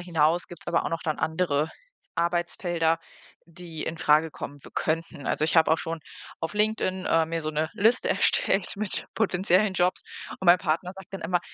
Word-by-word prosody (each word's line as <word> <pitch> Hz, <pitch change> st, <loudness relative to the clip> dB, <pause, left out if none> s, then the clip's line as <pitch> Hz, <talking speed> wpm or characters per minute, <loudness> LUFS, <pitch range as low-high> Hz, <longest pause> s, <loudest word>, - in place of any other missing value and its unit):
hinaus 170 Hz, -1 st, +1 dB
gibt's 175 Hz, -, -12 dB
aber 170 Hz, -, +1 dB
auch -, -, -2 dB
noch 165 Hz, 0 st, -3 dB
dann 155 Hz, -2 st, -2 dB
andere 160 Hz, -2 st, 0 dB, 0.4 s
Arbeitsfelder, 170 Hz, -1 st, 0 dB, 0.5 s
die 170 Hz, -2 st, -8 dB
infrage 160 Hz, -1 st, +2 dB
kommen 145 Hz, -1 st, -7 dB
w -, -, -12 dB
könnten. 160 Hz, -2 st, -2 dB
Also, 155 Hz, -, +1 dB
ich 160 Hz, +2 st, +1 dB
habe 160 Hz, -1 st, +5 dB
auch 160 Hz, -, +2 dB
schon 165 Hz, 0 st, -4 dB, 0.4 s
auf 165 Hz, -, -3 dB
LinkedIn, 210 Hz, -3 st, 0 dB
ähm, 165 Hz, -1 st, +3 dB
mir 165 Hz, 0 st, -1 dB
so 155 Hz, -, -2 dB
'ne 155 Hz, +1 st, -1 dB
Liste 225 Hz, +4 st, +2 dB
erstellt 195 Hz, 0 st, +2 dB
mit 210 Hz, -1 st, -2 dB
potenziellen 195 Hz, -1 st, +2 dB
Jobs 180 Hz, +1 st, +1 dB, 0.4 s
und 190 Hz, -, -5 dB
mein 175 Hz, +1 st, +8 dB
Partner 175 Hz, +1 st, -1 dB
sagt 195 Hz, 0 st, -13 dB
dann 195 Hz, -, -6 dB
immer: 175 Hz, +1 st, +1 dB
170 Hz, 180 wpm, -26 LUFS, 160-185 Hz, 0.5 s, mein